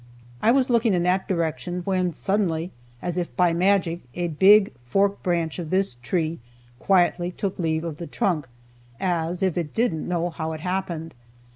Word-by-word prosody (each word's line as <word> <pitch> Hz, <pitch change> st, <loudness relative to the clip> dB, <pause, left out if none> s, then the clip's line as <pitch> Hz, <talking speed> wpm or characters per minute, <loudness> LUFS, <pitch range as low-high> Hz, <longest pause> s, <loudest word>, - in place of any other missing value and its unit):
I -, -, +3 dB
was 255 Hz, +1 st, +3 dB
looking 230 Hz, -4 st, +3 dB
in 175 Hz, -, +1 dB
that 185 Hz, +2 st, +1 dB
direction 175 Hz, 0 st, -2 dB
when 185 Hz, -2 st, +1 dB
suddenly, 180 Hz, -2 st, -1 dB, 0.3 s
as 175 Hz, 0 st, -1 dB
if 175 Hz, -, -4 dB
by 180 Hz, -2 st, +3 dB
magic, 180 Hz, -1 st, +2 dB, 0.2 s
a 175 Hz, -1 st, -1 dB
big 195 Hz, +6 st, +5 dB
forked 195 Hz, +10 st, +1 dB
branch 170 Hz, -2 st, -1 dB
of 165 Hz, -3 st, -5 dB
this 190 Hz, -5 st, +1 dB
tree 160 Hz, +6 st, -1 dB, 0.4 s
quietly 175 Hz, -1 st, +2 dB
took 190 Hz, +1 st, -4 dB
leave 160 Hz, -2 st, 0 dB
of 165 Hz, -3 st, -5 dB
the 170 Hz, -, -6 dB
trunk, 160 Hz, -8 st, -1 dB, 0.5 s
as 175 Hz, 0 st, -1 dB
if 185 Hz, -2 st, +1 dB
it 155 Hz, -4 st, -5 dB
"didn't 220 Hz, -9 st, 0 dB
know 175 Hz, 0 st, -1 dB
how 160 Hz, -1 st, -4 dB
it 155 Hz, -, -7 dB
happened." 170 Hz, -3 st, -3 dB
175 Hz, 170 wpm, -24 LUFS, 165-190 Hz, 0.5 s, big